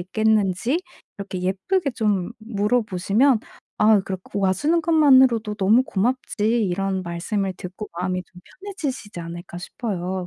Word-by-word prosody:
있겠는지 215 - +1 0.4
이렇게 195 -2 -5
예쁘게 275 - 0
좀 205 -5 0
물어보시면 215 +2 +1 0.4
"아 215 -1 +5
그래. 190 0 -4
그 200 - -5
와 190 -1 +3
주는 305 - +1
것만으로도 260 -9 +4
너무 215 +5 +4
고맙지." 225 0 0
이런 190 0 -1
말씀을 185 +3 -2
듣고 185 +4 -8
마음이 185 0 -1
좀 180 - -14 0.2
편해지시지 285 - -5
않을까 170 +1 -8
싶어요. 185 -2 -4
205 Hz, 320 characters per minute, -23 LUFS, 185-240 Hz, 0.4 s, 아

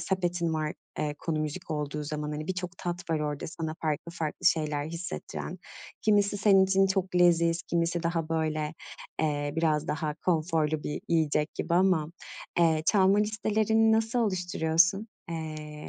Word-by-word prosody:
sepetin 175 -2 -1
var, 155 -1 -1 0.3
eee, 150 -1 -1
konu 160 -2 -2
müzik 155 +3 -4
olduğu 150 0 -3
zaman. 150 0 -3
Hani, 155 +1 -4
birçok 180 -1 -4
tat 175 0 -4
var 155 -2 +1
orada 150 -1 -3
sana 160 -1 -4
farklı 155 +2 -2
farklı 165 +1 -3
şeyler 150 -3 +2
hissettiren. 170 +3 -6 0.4
Kimisi 205 -1 +3
senin 195 -2 +5
için 195 0 +3
çok 190 -1 -1
leziz, 170 -1 +4
kimisi 170 0 0
daha 165 -1 -1
böyle, 155 -1 -1 0.5
eee, 145 -2 0
biraz 155 -2 +1
daha 155 -1 -1
konforlu 155 -2 0
bir 150 - -4
yiyecek 155 -2 +1
gibi 170 - -1
ama, 175 -4 +3 0.5
eee, 160 -2 +3
çalma 195 0 +5
listelerini 220 +1 +2
nasıl 225 +2 +1
oluşturuyorsun? 180 -1 +2 0.2
Eee, 155 -2 -6
165 Hz, 145 wpm, -28 LUFS, 155-185 Hz, 0.5 s, senin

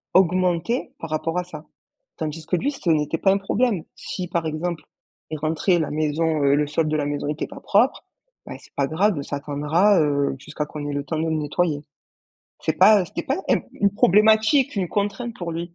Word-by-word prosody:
augmentait 185 +5 +2
par 165 - -8
rapport 165 +2 -1
à 180 - 0
ça. 180 - -10 0.5
Tandis 155 0 -5
que 180 - +1
lui, 270 +11 0
ce 270 -11 -4
n'était 155 0 +1
pas 195 - +4
un 195 - +3
problème. 200 -1 0
Si 180 - -5
par 170 -2 -1
exemple, 160 +2 -3 0.5
il 155 - -4
rentrait, 160 +4 +1
la 155 - -2
maison, 155 +1 0
heu, 140 0 +4
le 150 +1 +2
sol 155 +2 0
de 155 0 0
la 145 - -1
maison 145 0 -3
était 150 +1 -2
pas - - -10
propre, 230 +7 +2 0.4
bah, - - -6
c'est - - -20
pas 140 - +1
grave 170 +1 +1
ça 140 - -5
attendra, 150 +8 +2
heu, 140 -2 +1
jusqu'à 150 +2 -5
qu'on 150 -1 -6
ait 145 - -3
le 140 0 -2
temps 155 +3 -3
de 160 - 0
le 160 - 0
nettoyer. 150 0 -1 0.8
C'est - - 0
pas 210 -3 +6
c'était 170 - -5
pas 270 - 0
un - - +4
une 200 - +1
problématique, 220 +7 +4
une 190 -2 0
contrainte 205 +5 -2
pour 175 -2 -5
lui. 170 +1 -6
165 Hz, 210 wpm, -23 LUFS, 150-195 Hz, 0.8 s, pas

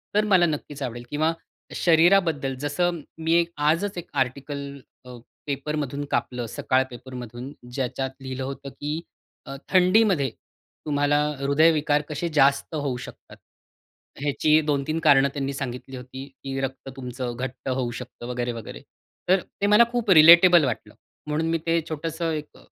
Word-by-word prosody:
तर 210 - +4
मला 190 -4 +4
नक्कीच 150 -2 -4
आवडेल 120 -1 -5
किंवा 155 +2 +1 0.4
शरीराबद्दल 165 -5 +3
जसं 170 +5 -1 0.2
मी 165 +1 +3
आजच 165 +7 +1
एक 175 - -7
आर्टिकल 140 +2 -7 0.3
अ, 125 -1 -10 0.3
पेपरमधून 145 0 -3
कापलं 125 -1 -1
सकाळ 130 +3 +1
पेपरमधून 125 +1 -8 0.2
ज्याच्यात 130 0 -2
लिहिलं 130 0 -5
होतं, 140 +1 -6
की 150 +4 -4 0.4
अ, 135 - -7
थंडीमध्ये 185 -5 +4 0.6
तुम्हाला 145 -1 +2 0.2
हृदयविकार 150 +1 +3
कसे 155 +3 -3
जास्त 140 +2 +3
होऊ 145 -4 -2
शकतात? - - -11 0.8
ह्याची 150 +2 +3
2-3 150 +2 0
कारणं 140 -3 +5
त्यांनी 140 -1 -3
सांगितली 130 -1 -6
होती. 130 +1 -8
की 135 0 -7
रक्त 135 0 -5
तुमचं 125 -2 -5
घट्ट 130 +1 -5
होऊ 130 -2 -1
शकतं 125 -1 -9
वगैरे-वगैरे. 120 -2 -5 0.5
तर 190 0 +4 0.2
ते 200 - +3
मला 210 +3 +7
खूप 240 -3 -2
रिलेटेबल 170 +1 +8
वाटलं. 125 -4 -4 0.3
म्हणून 155 +2 -1
मी 165 - +1
ते 165 0 +3
छोटंसं 165 +1 -3
एक 150 -1 -6
145 Hz, 135 wpm, -24 LUFS, 130-160 Hz, 0.8 s, रिलेटेबल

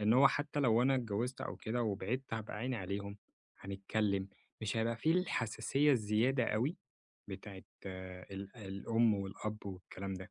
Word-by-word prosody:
إن 105 +2 +4
هو 135 +2 +8
حتّى 145 +1 -1
لو 120 -2 +5
أنا 135 +1 +5
اتجوزت 120 +1 -1
أو - - -3
كده 120 +2 -1
وبعدت 115 +4 -1
هابقى 110 -1 -4
عيني 125 +3 -1
عليهم، 100 +1 -3 0.4
هنتكلّم 100 0 0 0.3
مش 110 0 -1
هيبقى 115 +1 +1
فيه 160 +7 +3
الحساسية 145 - +2
الزيادة 115 +3 +3
أوي 125 - +1 0.5
بتاعة 95 0 -7 0.2
ال 95 +3 -7
الأم 110 +2 +2
والأب 100 +2 -4
والكلام 95 0 -5
ده، 95 0 -8
110 Hz, 145 wpm, -36 LUFS, 100-125 Hz, 0.5 s, هو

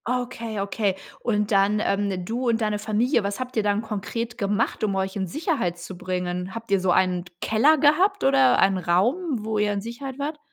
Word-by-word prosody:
Okay, 240 -3 -3
okay. 200 0 -1 0.2
Und 210 -2 0
dann, 200 +1 +3
ähm 200 -3 -1
du 240 +5 -2
und 230 0 +1
deine 210 -1 0
Familie, 220 +3 +1
was 200 +2 -3
habt 255 0 -5
ihr 220 - +3
dann 205 +1 0
konkret 225 +3 -4
gemacht, 205 +2 0
um 200 -2 +1
euch 190 0 -2
in 190 -2 -2
Sicherheit 250 - -1
zu 175 +2 -8
bringen? 180 +1 -3
Habt 230 -2 -8
ihr 195 - +4
so 185 0 -1
einen 180 -1 +2
d 175 - -16
Keller 270 - +4
gehabt 355 +8 +3
oder 270 -1 +5
einen 195 -1 +3
Raum, 230 - 0
wo 220 -1 -1
ihr 210 0 +2
in 200 - -2
Sicherheit 255 +4 -7
wart? 295 +2 -4
215 Hz, 205 wpm, -24 LUFS, 195-245 Hz, 0.2 s, oder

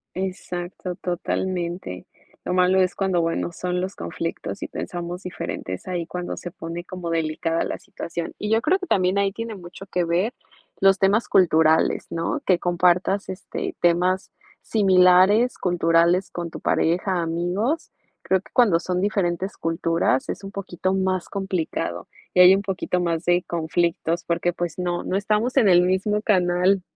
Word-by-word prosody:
Exacto, 180 -1 -5
totalmente. 175 - -3 0.4
Lo - - -1
malo 185 +1 +4
es 185 -1 +1
cuando 190 -3 0
bueno 165 +1 -1
son 180 +1 -2
los 185 +2 -3
conflictos 85 - -5
y - - -3
pensamos 175 +1 -5
diferente, 135 - -5
es - - -10
ahí 175 -2 -3
cuando 180 +1 -5
se 175 - -7
pone 170 0 -7
como 180 -2 -6
delicada 165 0 -1
la - - -4
situación. 170 0 -6
Y 210 - -3
yo 225 +1 +3
creo 370 +5 +2
que 370 - -6
también 185 +1 +2
ahí 200 0 +1
tiene 230 +2 -5
mucho 185 +1 -11
que 180 -1 -1
ver 175 +7 0 0.5
los 195 0 +5
temas 200 +4 +2
culturales, 160 -3 +3
¿no?, 165 - -2
que 185 -2 +4
compartas, 180 +3 +1
este, 380 - -5
temas 180 +2 +2 0.3
similares, 190 +3 +4
culturales 170 +1 +2
con 170 -1 -5
tu - - -8
pareja, 180 +2 +1
amigos. 175 - -1 0.3
Creo 190 0 +1
que - - -20
cuando 215 -9 +4
son 180 +1 -2
diferentes 190 -1 -1
culturas 165 -4 0
es - - -4
un 195 - -6
poquito 185 -2 -3
más 190 -2 0
complicado 180 - -3 0.3
y 180 - +4
hay 180 +1 +9
un 195 - 0
poquito 185 -2 -2
más 170 -1 -1
de 175 0 +3
conflictos 170 0 -1
porque 170 +1 0
pues 175 -1 -4
no, 175 -1 -1
no 185 - -1
estamos 215 +5 0
en 235 -7 +5
el 175 -1 +6
mismo 190 +3 +1
canal. 185 -1 +2
180 Hz, 165 wpm, -23 LUFS, 170-195 Hz, 0.5 s, hay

